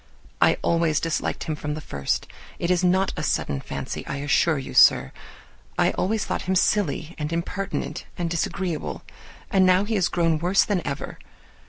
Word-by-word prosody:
I - - +5
always 165 -2 +2
disliked 165 -1 -2
him 155 -2 -3
from 150 0 -4
the - - -5
first: 70 - -2 0.3
it 170 - -1
is 180 0 +2
not 185 +1 +2
a - - -3
sudden 70 -1 -1
fancy, - - -5
I - - -3
assure 150 +3 +2
you, 135 - -6
sir; - - +6 0.7
I - - +3
always 215 +2 -1
thought - - -2
him 190 - +2
silly 175 -4 +1
and 150 +1 -3
impertinent 170 +4 -3
and 175 -2 -1
disagreeable, 170 0 -3 0.5
and 195 -3 +4
now 185 +1 +5
he 220 +2 -2
is 190 -4 +2
grown 165 -2 +1
worse 180 +4 +3
than 200 -4 0
ever. 140 -1 -5
170 Hz, 175 wpm, -24 LUFS, 155-190 Hz, 0.7 s, sir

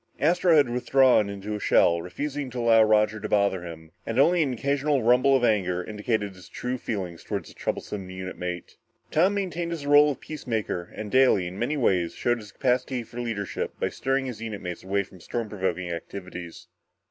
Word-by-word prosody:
Astro 170 +2 +4
had 145 -3 +5
withdrawn 125 -2 +3
into 100 +1 -5
a 105 - -3
shell, 85 -4 +3
refusing 140 - -4
to 125 - -8
allow 115 -1 +5
Roger 110 0 +3
to - - -5
bother 100 -3 +2
him 80 -2 -9
and 115 - -4
only 170 +6 +5
an 140 -4 +1
occasional 140 +2 0
rumble 125 +4 +5
of 130 - +1
anger 90 -6 +1
indicated 105 0 -2
his 90 -2 -15
true 125 +1 -4
feelings 95 -8 -4
toward - - -4
his - - -13
troublesome 95 -3 -4
unit 95 0 -6
mate. 90 -1 -6 0.3
Tom 185 +6 +3
maintained 175 -4 -2
his 165 -4 -5
role 145 +1 +6
of 145 - -3
peacemaker 110 - -4
and 105 -1 -6
daily, 130 -8 +4
in 90 +3 -6
many 145 +6 -1
ways, 90 -9 +1
showed 120 0 0
his 105 -2 -12
capacity 125 0 0
for 115 +2 -10
leadership 110 -4 -4
by - - 0
steering 135 0 -1
his 125 -4 -6
unit 110 -3 -5
mates 90 -1 -5
away 100 +1 0
from 95 -1 -16
any - - -18
storm 115 +5 -3
provoking 95 -3 -2
activities. 90 0 -7
110 Hz, 195 wpm, -26 LUFS, 95-135 Hz, 0.3 s, role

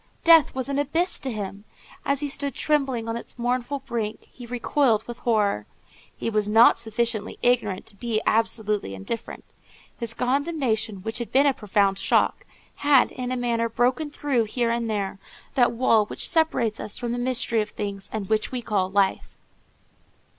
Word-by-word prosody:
Death 330 -4 +6
was 260 0 -2
an 280 0 -1
abyss 325 +6 +1
to 265 - -3
him. 200 -2 -6 0.4
As 280 0 +1
he 295 - -1
stood 280 -1 -4
trembling 270 -6 0
on 225 - -2
its 235 - -6
mournful 250 +3 -1
brink, 225 -5 -4
he 245 -2 -11
recoiled 240 -2 +1
with 240 0 -7
horror. 205 - +1 0.5
He - - -4
was 215 -2 0
not 225 +2 +6
sufficiently 230 -1 -1
ignorant 225 -6 +1
to 210 - -9
be 225 +1 -1
absolutely 215 - 0
indifferent. 215 - -6 0.6
His 230 -2 -3
condemnation, 250 - -1
which 225 +2 -4
had 235 - -5
been 275 +2 +4
a 280 - +4
profound 200 -3 +1
shock, - - +1 0.3
had, 285 -2 +4
in 250 -1 -5
a 255 - -1
manner, 230 -1 0
broken 250 +6 +1
through, 275 -5 0
here 235 +2 0
and 235 -1 -1
there, 200 -2 -2 0.3
that 245 -3 +3
wall 230 -3 +3
which - - -3
separates 285 -9 +1
us 210 - -3
from 240 -2 -3
the 240 - -2
mystery 245 -2 +1
of 210 - -4
things, 200 -2 -6
and 210 -3 -4
which 215 +1 0
we 250 -2 -3
call 195 -4 0
life. 195 -1 0
235 Hz, 175 wpm, -24 LUFS, 215-255 Hz, 0.6 s, Death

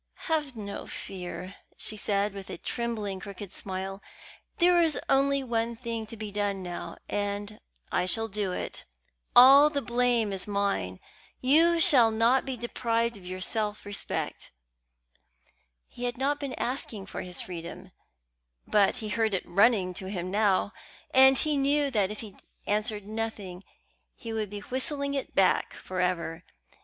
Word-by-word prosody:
"Have 300 -5 -1
no 200 -2 -6
fear," 185 0 -7 0.2
she 215 - -4
said, 200 -1 0
with 195 -1 -8
a - - -5
trembling, 220 -5 -3
crooked 200 -1 -8
smile; 195 0 -5 0.6
"there 350 0 +5
is 320 -3 +2
only 275 0 +3
one 235 -1 -1
thing 230 -2 -4
to 230 - -8
be 215 -1 -5
done 200 -2 -1
now, 175 -1 -6
and 205 +1 -3 0.3
I 180 - +1
shall 225 +4 0
do 205 -2 -2
it. - - -4 0.5
All 275 +4 +9
the 290 -2 -1
blame 240 -3 +2
is 190 +1 -5
mine. 200 - -1 0.4
You 330 +6 +5
shall 280 -10 +6
not 230 +4 +3
be 265 -2 -3
deprived 235 0 -1
of 185 -3 -12
your 185 0 -5
self 210 +1 -2
respect." 205 -1 -4 1.4
He 245 - -6
had 245 -1 -2
not 285 +3 0
been 275 -3 -4
asking 235 -5 -3
for - - -6
his 180 -1 -7
freedom; 170 -2 -7 0.7
but 205 +3 +3
he - - -3
heard 220 -1 +1
it 185 - -3
running 195 -1 +3
to 190 +1 -5
him 185 -2 -4
now, 200 -1 +2 0.4
and 265 0 +7
he 305 -2 +1
knew 280 +1 +2
that 205 -6 +2
if 210 - -6
he 210 -4 -9 0.3
answered 210 0 -1
nothing 210 -4 -5 0.5
he 225 -1 -7
would 215 -2 -2
be 205 0 -6
whistling 280 +4 -2
it 275 -2 -3
back 190 - +3
for 185 -1 -4
ever. 175 -2 -1
215 Hz, 155 wpm, -28 LUFS, 195-250 Hz, 1.4 s, All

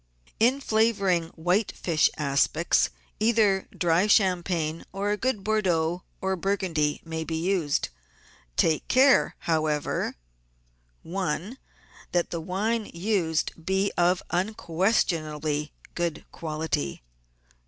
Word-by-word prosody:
In 250 +5 +3
flavouring 210 -8 +2
white 180 +6 +1
fish 160 -3 +2
aspics 150 +3 +2 0.3
either 215 -3 +3
dry 175 +3 +2
champagne 175 -5 +2
or 200 +1 -1
a - - +2
good 215 -2 -1
Bordeaux 180 -5 +1 0.2
or 190 0 0
Burgundy 175 -6 -1
may 160 0 -3
be 160 0 -4
used. 165 - 0 0.7
Take 160 -2 +2
care, 265 +1 +4
how 160 -3 +1
ever— 150 -1 -1 0.9
1. 185 - -3 0.5
That 175 -1 +1
the 170 - -3
wine 210 +6 -1
used 170 -3 0
be 190 +3 +1
of 175 +1 +2
an 180 +3 +1
unquestionably 160 -7 0 0.2
good 170 -3 -2
quality. 155 - -3
175 Hz, 110 wpm, -26 LUFS, 160-200 Hz, 0.9 s, care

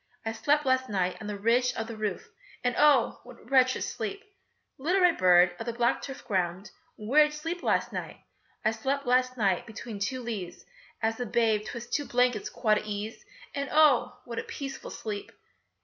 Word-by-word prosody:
I 225 - -1
slept 295 +6 +1
last 260 0 +2
night 185 -3 0
on 215 - -6
the 210 -1 -4
ridge 245 +4 +2
of 225 - -2
the 230 0 -7
roof, 215 - -3 0.4
And 245 0 +1
oh! 290 -4 +4
what 245 -1 -13
a - - -18
wretched 255 0 +3
sleep! 400 +1 -4 0.6
Little 350 +8 +2
red 360 -2 +4
bird 180 -1 +5
of 225 - -6
the 235 - -1
black 235 0 +1
turf 270 0 -8
ground, 185 0 -1 0.2
Where 245 +9 +3
did 300 0 +3
you - - -6
sleep 330 +3 -4
last - - 0
night? - - -5 0.5
I 220 - +4
slept 270 +5 -2
last 255 +1 +2
night 195 -4 +1
between 220 -1 -7
two 250 +5 -2
leaves 200 -7 -6 0.4
As 225 +1 0
a 245 - -1
babe 220 -2 +2
'twixt 240 0 -7
two 290 - 0
blankets 245 -4 +1
quite 215 -3 +2
at - - -10
ease, 210 +1 -5 0.3
And 280 -1 -3
oh! 300 -5 +4
what 235 -2 -4
a - - -3
peaceful 275 -1 -6
sleep! 210 -2 -6
235 Hz, 195 wpm, -28 LUFS, 210-270 Hz, 0.6 s, bird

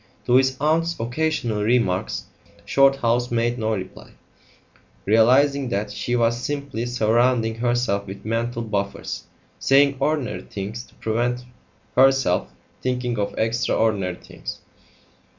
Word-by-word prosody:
To 120 - +1
his 130 0 +2
aunt's 165 +3 +1
occasional 120 -3 -1
remarks 105 -4 +1 0.4
Shorthouse 125 -3 +3
made 120 +1 0
no 110 0 0
reply, 95 -1 -8 0.9
realising 130 +6 +4
that 105 -1 -2
she 120 +4 -2
was 120 0 +1
simply 140 -4 -3
surrounding 120 0 +2
herself 120 -3 0
with 95 +1 -9
mental 115 +1 -1
buffers 100 -3 -3 0.3
saying 140 0 +4
ordinary 145 -2 -1
things 105 +4 -6
to - - -24
prevent 120 +2 -1 0.5
herself 135 -8 +4 0.3
thinking 125 -2 -1
of 100 - -2
extra 115 +1 0
ordinary 100 -5 +1
things. - - -8
120 Hz, 115 wpm, -23 LUFS, 110-130 Hz, 0.9 s, realising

